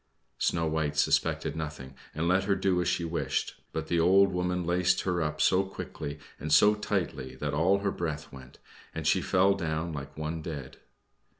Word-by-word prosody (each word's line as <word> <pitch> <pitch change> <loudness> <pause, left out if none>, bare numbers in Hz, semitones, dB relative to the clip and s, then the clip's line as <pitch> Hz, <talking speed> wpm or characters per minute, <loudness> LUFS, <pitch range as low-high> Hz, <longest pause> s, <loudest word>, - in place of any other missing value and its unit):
Snow 85 -1 +1
White 80 -2 -1
suspected 70 - +1
nothing, 75 -4 -6 0.2
and 80 +2 -1
let 95 +2 +3
her 100 0 +2
do 90 -3 +1
as - - -1
she 85 - 0
wished, 85 +1 -2
but 80 -1 -3
the 85 +1 0
old 95 +3 +5
woman 90 0 -1
laced 90 +1 +2
her 90 -2 -1
up 75 -1 -2
so 90 +4 +4
quickly 75 -6 -6 0.2
and 75 - -4
so 105 +7 +7
tightly 90 -11 -3
that 70 +2 -3
all 85 +6 +3
her 100 -1 0
breath 80 -5 -4
went, 65 -2 -12 0.4
and - - -4
she - - +3
fell 95 +2 +3
down 85 -3 -2
like 70 -1 -7
one 80 +1 -3
dead. 75 -5 -7
80 Hz, 185 wpm, -29 LUFS, 75-90 Hz, 0.4 s, so